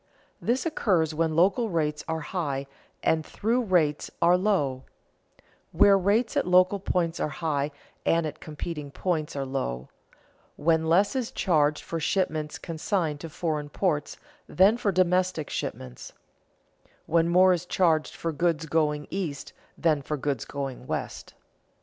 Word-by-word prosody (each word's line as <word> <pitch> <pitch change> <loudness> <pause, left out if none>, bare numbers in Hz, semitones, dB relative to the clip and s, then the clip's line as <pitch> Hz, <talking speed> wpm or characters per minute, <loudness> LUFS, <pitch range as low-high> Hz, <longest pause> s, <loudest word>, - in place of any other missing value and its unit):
_ - - -41 0.4
This 245 +6 0
occurs 180 - +1
when 160 0 0
local 200 +7 +3
rates 150 -4 -1
are 160 0 -2
high 145 -5 -3 0.4
and 160 -1 +2
through 230 +9 0
rates 170 -9 +1
are 170 +1 +5
low; 150 -10 0 0.9
when 200 -2 +5
rates 220 +5 +2
at - - +1
local 185 +2 +4
points 175 -3 -1
are - - 0
high 150 -2 -1 0.3
and 165 0 +2
at 155 0 -5
competing 150 -1 -6
points 155 0 -2
are 140 -1 -2
low; 70 - -3 0.7
when 160 +1 +1
less 195 +8 +3
is 255 -3 -1
charged 150 -5 +1
for 165 - -4
shipments 155 -3 -1
consigned 165 -2 -2
to 165 - -7
foreign 150 -2 -3
ports 150 -3 -1 0.3
than 195 +5 +5
for 220 -4 0
domestic 180 -3 +1
shipments; 60 -1 -6 0.9
when 165 +1 +2
more 185 +1 +6
is 180 0 -3
charged 160 -4 +1
for 165 - -3
goods 165 +1 0
going 150 -1 0
east 170 -8 -4 0.2
than 155 -3 +2
for 150 +2 -3
goods 135 -3 -2
going 135 -3 -6
west. - - -5
165 Hz, 145 wpm, -26 LUFS, 150-185 Hz, 0.9 s, more